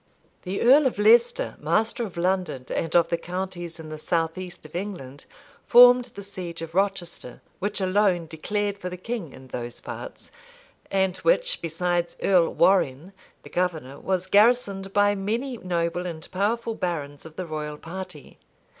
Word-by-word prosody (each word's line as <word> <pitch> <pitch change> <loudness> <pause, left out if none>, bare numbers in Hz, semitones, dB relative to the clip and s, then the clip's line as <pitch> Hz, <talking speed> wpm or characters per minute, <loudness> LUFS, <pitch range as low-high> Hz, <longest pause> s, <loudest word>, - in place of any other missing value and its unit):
The 190 +1 -4
earl 270 +4 +7
of 250 - -3
Leicester, 230 +3 +4
master 215 +10 +1
of 195 -6 -7
London, 175 -7 -1
and 165 0 -2
of 170 -1 +5
the 170 - 0
counties 175 -2 -5
in 160 -1 -8
the 155 0 -7
south 165 0 0
east 185 -3 -8
of 155 - -12
England, 175 -8 -6 0.4
formed 245 0 +8
the 200 - -7
siege 175 -4 -7
of 165 0 -8
Rochester, 185 -9 -2 0.2
which 205 +2 -2
alone 190 -2 +2
declared 200 +6 -3
for 180 - -4
the 180 - -7
king 195 - -5
in 130 0 -13
those 120 -1 -5
parts, - - -8 0.6
and 190 -1 +1
which, - - +1
besides 175 +1 -1
Earl 180 -4 +3
Warrenne, 175 -2 +2 0.3
the - - -13
governor, 160 -7 -2
was 185 -1 -1
garrisoned 200 -1 +3
by 205 0 +4
many 230 +6 -2
noble 175 0 -1
and 160 -2 -7
powerful 225 +5 0
barons 150 -8 -4
of 160 -1 -12
the 185 - -4
royal 150 -2 -5
party. 175 -2 -9
180 Hz, 160 wpm, -25 LUFS, 165-205 Hz, 0.6 s, formed